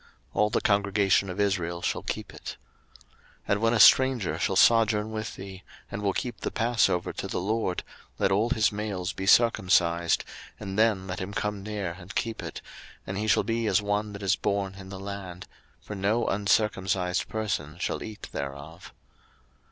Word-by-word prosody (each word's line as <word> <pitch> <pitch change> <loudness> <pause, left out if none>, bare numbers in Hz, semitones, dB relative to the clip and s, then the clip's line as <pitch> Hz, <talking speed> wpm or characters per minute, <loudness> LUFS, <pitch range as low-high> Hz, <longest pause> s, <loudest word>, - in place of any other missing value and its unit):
02:012:047 - - -27 0.3
All 105 - +4
the 115 - 0
congregation 100 -1 +2
of 90 +2 -6
Israel 90 -4 0
shall - - -1
keep - - -5
it. - - -8 0.9
02:012:048 - - -15
And 100 +1 +2
when 115 +1 +3
a - - +1
stranger 130 -4 +5
shall - - 0
sojourn 110 -2 +4
with 110 -1 -4
thee, 95 -1 -9 0.3
and 105 - -4
will 100 -2 +1
keep 120 -3 -4
the - - -2
passover 115 -7 +1
to - - -5
the - - -2
LORD, 100 -1 -1 0.3
let 95 - +1
all 105 +5 +2
his 110 0 +2
males 100 -3 -3
be 95 - -5
circumcised, 90 -7 +3 0.3
and 100 -1 -4
then 110 -4 +3
let 90 -1 -5
him 100 +2 -5
come 105 -1 -2
near 100 -3 -4
and 90 +3 -11
keep 115 -1 -2
it; - - -7 0.4
and 95 +1 -4
he 110 - -2
shall 110 - +4
be 115 0 -1
as 100 -1 +3
one 105 0 -1
that 100 0 -8
is 95 0 +3
born 100 -1 -1
in 95 -1 -11
the 95 -1 -7
land: 95 -2 -7 0.3
for - - -8
no 105 +4 +1
uncircumcised 95 -3 +1
person 85 -8 -3
shall - - -2
eat 110 -1 -8
thereof. 70 +5 -7
100 Hz, 185 wpm, -27 LUFS, 95-110 Hz, 0.9 s, stranger